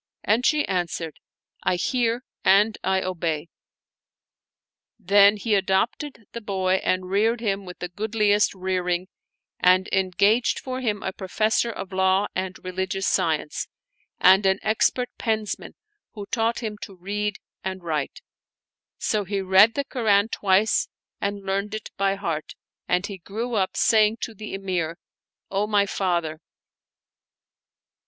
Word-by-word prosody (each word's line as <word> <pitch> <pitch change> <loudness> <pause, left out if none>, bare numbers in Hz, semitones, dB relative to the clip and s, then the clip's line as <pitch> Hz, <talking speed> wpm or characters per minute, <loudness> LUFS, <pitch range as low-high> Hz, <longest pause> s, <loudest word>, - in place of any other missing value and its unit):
And 220 +4 +2
she 305 -1 +2
answered, 175 -3 -3 0.2
" - - -69
I - - +2
hear 240 +5 0 0.2
and 205 +3 +5
I 190 0 +1
obey." 170 -3 -2 1.5
TTien 200 +1 +5
he 215 +1 -1
adopted 205 +6 0
the 235 - -6
boy 190 -2 0
and 185 0 -1
reared 225 +4 +2
him 200 -3 -2
with 180 -1 -9
the 180 - -4
good 215 +5 -5
liest 210 -1 +3
rearing, 185 -1 -1 0.5
and 185 +1 +4
engaged 200 +5 +2
for 255 0 -5
him 215 -4 -1
a 190 - -3
professor 215 +5 0
of 195 -4 -7
law 190 +1 +3
and 185 0 -3
religious 190 +1 -2
science, - - 0 0.5
and 190 +2 +6
an 190 0 +3
expert 230 +3 +1
pensman 220 -2 -2 0.4
who 205 -2 -7
taught 230 0 0
him 210 -2 -4
to 195 - -8
read 205 +3 -3 0.3
and 190 -1 -4
write; 155 -4 -3 0.8
so 215 -2 0
he 200 +1 -2
read 190 +4 +5
the 280 -1 -1
Koran 220 -6 +2
twice 200 +1 +2 0.3
and 200 0 -3
learned 200 +2 -1
it 215 - -7
by 195 0 +1
heart, 165 -6 -4 0.3
and 180 +2 +1
he 200 -2 -7
grew 225 +7 -5
up, 195 -4 0
saying 220 0 +4
to 230 - -4
the 215 -1 -7
Emir, 180 -4 -2 0.2
" - - -58
O 200 +2 0
my 205 -1 +3
father 170 -5 -1
195 Hz, 145 wpm, -24 LUFS, 185-215 Hz, 1.5 s, and